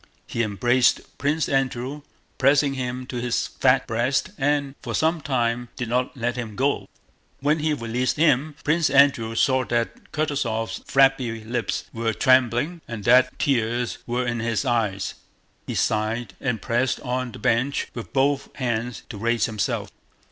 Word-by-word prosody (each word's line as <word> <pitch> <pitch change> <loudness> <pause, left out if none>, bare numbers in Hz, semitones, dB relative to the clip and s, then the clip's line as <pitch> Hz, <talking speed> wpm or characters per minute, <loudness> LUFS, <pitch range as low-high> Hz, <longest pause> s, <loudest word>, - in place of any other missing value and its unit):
He 120 - -2
embraced 120 +4 +2
Prince 150 +2 +1
Andrew, 135 +1 -1 0.4
pressing 140 +1 +4
him 125 -1 -4
to 125 -1 -6
his 120 0 0
fat - - +2
breast, 120 +10 0
and 140 -2 0
for - - -4
some 160 +1 +1
time 120 -3 -1
did 125 -4 -4
not 125 +3 -1
let 120 0 -1
him 115 -4 -5
go. 140 +4 0 0.5
When 150 +3 +2
he 150 0 +1
released 120 +2 -1
him 150 -1 +2
Prince 160 +2 +2
Andrew 135 -5 +4
saw 130 +2 +3
that 120 -1 -2
Kutúzov's 135 -8 -1
flabby 135 -5 +3
lips 115 +1 -2
were 115 -1 -1
trembling 130 +8 +2
and 110 -3 -6
that 125 +2 +4
tears 120 -2 0
were 125 +1 -1
in 120 -1 -1
his 115 +3 -1
eyes. 105 - 0 0.5
He - - -3
sighed 110 +1 0
and 125 -6 -2
pressed 125 +1 0
on 125 -1 -2
the - - -10
bench 125 +6 +1
with 120 - -7
both 140 +1 +1
hands 120 -2 -2
to 105 - -7
raise 115 0 +1
himself. 110 -3 -2
125 Hz, 155 wpm, -24 LUFS, 115-135 Hz, 0.5 s, pressing